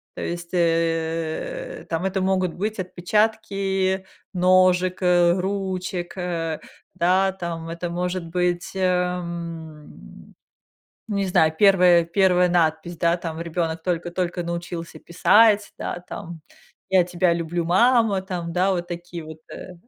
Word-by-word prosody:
То - - -6
есть, 175 0 -5
э, 165 - -1
там, 165 +2 -2
это 190 0 -1
могут 185 -2 +1
быть: 215 +3 -3
отпечатки 195 0 0 0.3
ножек, 185 0 +3
э, 175 -1 +4
ручек, 185 -2 -3
э, 165 -3 -3 0.4
да, 190 +2 +2
там, 170 -3 -5
это 170 +1 -4
может 180 +1 -3
быть, 175 +1 -1
эм, 170 - -4 0.7
не 200 -2 -1
знаю, 160 -3 +3
1- 180 -4 +6
1 180 +1 +3
надпись, 170 0 0
да, 170 +1 +2
там, 165 -2 -6
ребёнок 165 -1 -3
только-только 175 0 -2
научился 170 0 -5
писать, 210 +4 +4
да, - - -4
там: 170 -1 -8 0.5
"Я 190 -2 +5
тебя 175 0 +1
люблю, 170 0 -2
мама", 220 +1 +3
там, 175 -3 -4
да, 185 +2 +2
вот 175 -1 -2
такие 175 -1 -7
вот, 160 0 -10 0.2
э, 185 - -9
180 Hz, 125 wpm, -23 LUFS, 170-185 Hz, 0.7 s, 1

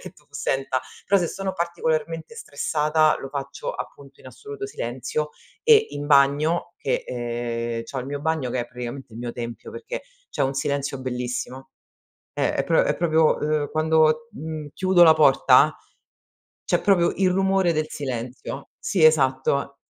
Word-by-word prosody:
che - - -9
tu - - -24
senta, 135 -1 -1 0.3
però 200 0 +4
se 175 - 0
sono 195 -1 -4
particolarmente 165 0 -2
stressata, 155 +1 +1
lo 135 - -6
faccio, 145 - -5
appunto, - - -9
in - - -15
assoluto 425 -2 -8
silenzio 150 - -3 0.3
e 450 -2 +6
in 145 0 -5
bagno 145 +5 +3
che 135 - -1
ehm, 120 -1 -3
c'ho 135 +3 -6
il 125 - -7
mio 145 0 -4
bagno 155 -4 -1
che 125 - -1
è 120 - -4
praticamente 125 0 -8
il 115 - -8
mio 120 0 -4
tempio, 115 -2 -7
perché - - -6 0.3
c'è - - -1
un 135 0 0
silenzio 140 -1 -2
bellissimo, 125 +1 -4 0.6
eh, - - 0
è - - 0
pro - - +3
è - - +1
proprio 160 -2 +3
uhm, 150 -1 -1
quando, 155 +7 +2
mhmm, 155 -4 -6
chiudo 185 -2 +4
la 160 -2 +8
porta, 140 -4 +5 0.9
c'è - - +1
proprio 180 -4 +3
il 190 -1 +3
rumore 190 -1 +2
del 155 -1 -1
silenzio. 130 0 -5
Sì, 185 - -1
esatto. 140 -2 +2
150 Hz, 160 wpm, -24 LUFS, 130-170 Hz, 0.9 s, la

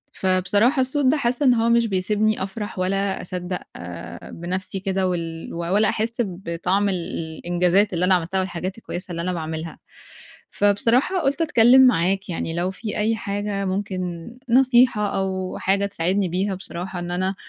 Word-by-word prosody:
فبصراحة 195 +8 +2
الصوت 265 +2 0
ده 280 +4 +4
حاسّة 250 +1 0
إن 250 - +6
هو 230 0 +2
مش 235 0 +3
بيسيبني 210 +2 0
أفرح 200 0 -5
ولا 195 +1 0
أصدّق 180 0 -4 0.7
بنفْسي 185 +3 -4
كده، 190 0 0
وال 165 -2 -4
و - - -5
ولا 200 +5 +2
أحِس 225 +2 -1
بِطَعم 185 0 -1
ال 190 - 0 0.4
الإنجازات 180 +3 +2
اللي 175 +1 +1
أنا 185 0 +5
عملتها 180 +2 -1
والحاجات 185 +1 -3
الكويسة 185 -4 -6
اللي 170 -1 -3
أنا 180 +1 -2
باعملها، 160 -1 -5 0.7
فبصراحة 230 - +2
قلُت 280 +2 0
اتكلّم 255 -4 +6
معاك 195 -2 +1
يعني، 165 -1 -3
لو 175 +2 -1
في 210 +3 -5
أي 220 +2 +1
حاجة 200 -1 -3
ممكن 185 -1 -3 0.2
نصيحة 245 -5 +4
أو 190 -1 -2
حاجة 200 +1 +1
تساعدني 190 +1 0
بيها 190 +3 -1
بصراحة 180 0 -6
إن 175 0 -5
أنا 185 +2 -1
195 Hz, 160 wpm, -23 LUFS, 180-215 Hz, 0.7 s, إن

